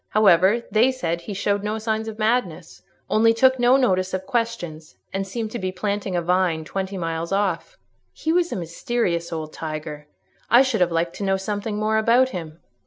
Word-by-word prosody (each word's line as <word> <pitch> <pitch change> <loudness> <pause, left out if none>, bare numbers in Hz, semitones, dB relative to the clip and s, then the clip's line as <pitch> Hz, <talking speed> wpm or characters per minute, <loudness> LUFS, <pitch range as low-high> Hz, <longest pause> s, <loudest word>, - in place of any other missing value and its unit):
However, 205 +2 +4
they 235 +4 +4
said 170 -10 -3
he 195 +4 -6
showed 200 +1 0
no 210 +1 -2
signs 220 0 -2
of 220 -1 -6
madness—only 215 +1 0
took 260 +2 +4
no 245 +2 +5
notice 185 -7 +1
of 190 0 -5
questions, 230 -11 -3 0.2
and 195 0 -2
seemed 220 +2 -4
to 240 - -4
be 185 0 -2
planting 200 0 -2
a 175 - 0
vine 175 -2 +1
twenty 195 +3 -4
miles 165 0 -3
off. 195 - -1 0.3
He 320 - -2
was 345 -1 +1
a - - -2
mysterious 170 0 -2
old 155 -2 -5
tiger. 155 -1 -6 0.4
I 240 +3 +7
should 250 -7 -1
have 175 -1 +3
liked 165 +1 -1
to - - -4
know 195 -1 +1
something 205 +2 -3
more 215 +1 +1
about 240 +4 +4
him." 165 -6 -7
195 Hz, 185 wpm, -23 LUFS, 170-225 Hz, 0.4 s, I